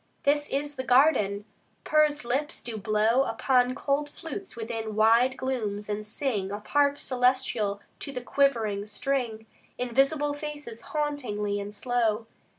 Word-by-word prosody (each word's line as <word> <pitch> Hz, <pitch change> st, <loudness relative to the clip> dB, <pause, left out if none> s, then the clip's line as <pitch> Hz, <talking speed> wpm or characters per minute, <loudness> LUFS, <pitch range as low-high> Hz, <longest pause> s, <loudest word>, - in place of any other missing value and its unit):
This 290 Hz, +1 st, +2 dB
is 290 Hz, +1 st, -2 dB
the 260 Hz, -, -2 dB
garden: 245 Hz, -7 st, +3 dB, 0.4 s
pursed 300 Hz, -3 st, +2 dB
lips 270 Hz, +5 st, -2 dB
do 235 Hz, -2 st, -5 dB
blow 215 Hz, +4 st, +2 dB
Upon 255 Hz, -2 st, +2 dB
cool 285 Hz, +2 st, 0 dB
flutes 355 Hz, +5 st, -7 dB
within 225 Hz, -2 st, -4 dB
wide 230 Hz, +4 st, +4 dB
glooms, 215 Hz, -6 st, -3 dB
and 210 Hz, 0 st, -2 dB
sing, 210 Hz, -3 st, -1 dB
Of 205 Hz, +1 st, -6 dB
harps 285 Hz, 0 st, +2 dB
celestial 250 Hz, -5 st, +1 dB, 0.2 s
to 280 Hz, -, -4 dB
the 250 Hz, -2 st, -5 dB
quivering 230 Hz, -7 st, +1 dB
string, 230 Hz, -1 st, -2 dB, 0.3 s
Invisible 275 Hz, +4 st, +1 dB
faces 290 Hz, -6 st, -6 dB
hauntingly 250 Hz, -10 st, -2 dB
and 200 Hz, 0 st, -5 dB
slow. 225 Hz, 0 st, 0 dB
250 Hz, 135 wpm, -27 LUFS, 215-285 Hz, 0.4 s, wide